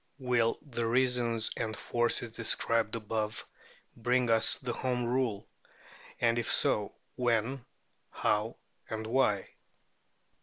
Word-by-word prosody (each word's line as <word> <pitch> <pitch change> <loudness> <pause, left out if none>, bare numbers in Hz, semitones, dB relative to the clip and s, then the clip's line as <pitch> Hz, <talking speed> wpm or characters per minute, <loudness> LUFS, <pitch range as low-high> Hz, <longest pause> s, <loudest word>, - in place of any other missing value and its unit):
Will 125 -4 +1
the 120 -5 -3
reasons 120 -2 +2
and 110 -2 -3
forces 120 -1 0
described 115 -1 +1
above 110 -1 -3 0.5
bring 120 +1 +1
us 110 0 +5
to 125 -2 -3
Home 125 0 -1
Rule? 120 -4 -1 0.7
and 115 0 +2
if 115 - -1
so, - - +3 0.2
when, 120 +1 0 0.5
how, 105 +2 0 0.3
and 110 0 -4
why? 110 -5 +1
115 Hz, 110 wpm, -30 LUFS, 110-125 Hz, 0.7 s, us